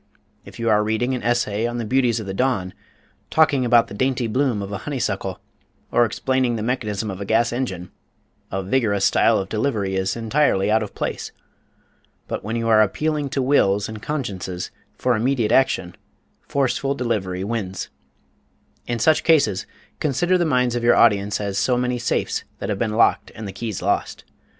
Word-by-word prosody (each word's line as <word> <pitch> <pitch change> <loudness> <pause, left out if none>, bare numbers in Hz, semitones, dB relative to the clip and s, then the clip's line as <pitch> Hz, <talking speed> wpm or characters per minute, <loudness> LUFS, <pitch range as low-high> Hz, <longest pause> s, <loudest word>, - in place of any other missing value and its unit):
If - - -12
you 115 - -2
are 105 -1 +4
reading 110 +4 0
an 125 - -2
essay 120 -2 0
on 120 0 -4
the 120 - -3
beauties 120 -1 +2
of 110 - -6
the 95 - -4
dawn, 95 -5 0 0.6
talking 150 -4 +3
about 120 -1 +5
the - - -10
dainty 130 +3 0
bloom 120 -2 0
of 100 - -7
a 100 - -4
honey 145 -2 -4
suckle, - - -2 0.5
or 120 - +4
explaining 130 +1 0
the 110 - -3
mechanism 110 -4 -2
of 95 +1 -7
a - - -1
gas 115 +3 +2
engine, 95 -9 -4 0.6
a 95 0 -2
vigorous 100 -2 +1
style - - +4
of 95 - -2
delivery 105 -3 -1
is 95 0 0
entirely 115 -3 +1
out 110 +1 +3
of 105 - -6
place. - - -4 1.0
But - - -4
when 110 +3 -3
you 115 0 -1
are 110 -1 +6
appealing 150 +7 0
to 135 -1 -1
wills 105 -7 +2
and 110 -1 -8
consciences 95 - -4 0.3
for 125 -1 +1
immediate 115 -1 +1
action, 105 -9 +2 0.5
forceful 135 0 0
delivery 100 -8 -2
wins. 100 -3 -4 1.0
In 120 - -1
such 155 +7 +3
cases, 140 - +3 0.3
consider 155 +6 +1
the 175 -1 +2
minds 125 -4 +2
of 120 - -2
your 120 - +5
audience 105 -3 +3
as 100 -1 -2
so 125 +3 +2
many 125 0 -1
safes 120 - -1
that - - -5
have 100 -2 -2
been 110 -2 -1
locked 115 - +3
and 110 -2 -6
the 95 - -7
keys 110 -1 -5
lost. - - -1
115 Hz, 185 wpm, -22 LUFS, 100-130 Hz, 1.0 s, are